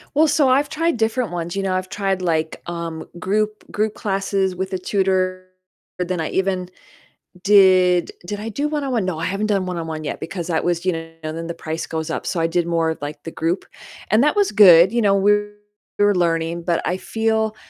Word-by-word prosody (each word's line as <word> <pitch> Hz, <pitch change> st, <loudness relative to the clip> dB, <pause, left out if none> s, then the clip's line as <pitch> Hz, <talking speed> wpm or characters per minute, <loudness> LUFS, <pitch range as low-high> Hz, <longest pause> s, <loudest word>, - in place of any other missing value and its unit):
Well, 315 Hz, +2 st, +5 dB
so 290 Hz, -3 st, +3 dB
I've 275 Hz, +3 st, +3 dB
tried 330 Hz, 0 st, 0 dB
different 225 Hz, -2 st, 0 dB
ones, 175 Hz, +2 st, -4 dB
you -, -, 0 dB
know, 190 Hz, -1 st, 0 dB
I've 185 Hz, 0 st, -3 dB
tried, 195 Hz, -2 st, -1 dB
like, 160 Hz, -3 st, -1 dB
um, 170 Hz, -2 st, -5 dB, 0.2 s
group 210 Hz, +3 st, -2 dB
group 215 Hz, 0 st, -1 dB
classes 195 Hz, -1 st, -1 dB
with 190 Hz, +1 st, -4 dB
a 190 Hz, -, -1 dB
tutor. 185 Hz, -1 st, 0 dB, 0.5 s
Then 180 Hz, -1 st, -1 dB
I 160 Hz, -, -2 dB
even 185 Hz, -1 st, -1 dB, 0.7 s
did 185 Hz, -3 st, +5 dB
Did 205 Hz, +1 st, -4 dB
I 225 Hz, -, -5 dB
do 285 Hz, +7 st, -1 dB
one-on-one? 270 Hz, -8 st, -1 dB
No, 170 Hz, -4 st, -2 dB
I 165 Hz, -, -3 dB
haven't 195 Hz, +4 st, -1 dB
done 195 Hz, -2 st, +1 dB
one-on-one 160 Hz, -3 st, -4 dB
yet, 145 Hz, -, -4 dB
because 170 Hz, +1 st, -5 dB
that 160 Hz, -2 st, 0 dB
was, 175 Hz, 0 st, -1 dB
you 185 Hz, -, +2 dB
know, 165 Hz, 0 st, -6 dB
then 160 Hz, +2 st, -5 dB
the 170 Hz, -, -5 dB
price 160 Hz, 0 st, -5 dB
goes 160 Hz, 0 st, -4 dB
up, -, -, -4 dB
so 170 Hz, -, -1 dB
I 165 Hz, -, +2 dB
did 170 Hz, +1 st, 0 dB
more 165 Hz, -1 st, +1 dB
of, 160 Hz, -, -4 dB
like, 145 Hz, 0 st, -6 dB
the 165 Hz, -, -5 dB
group, 165 Hz, +3 st, -2 dB, 0.5 s
and 215 Hz, +4 st, +4 dB
that 300 Hz, +6 st, +2 dB
was 410 Hz, -1 st, +2 dB
good, 190 Hz, -2 st, +8 dB
you 235 Hz, -, +1 dB
know, 200 Hz, -2 st, +4 dB
we 200 Hz, +1 st, +4 dB, 0.7 s
we 205 Hz, -, +4 dB
were 205 Hz, -, +4 dB
learning 170 Hz, -1 st, 0 dB
but 170 Hz, -1 st, 0 dB
I 180 Hz, -, 0 dB
feel, 220 Hz, 0 st, -1 dB
185 Hz, 215 wpm, -21 LUFS, 170-210 Hz, 0.7 s, good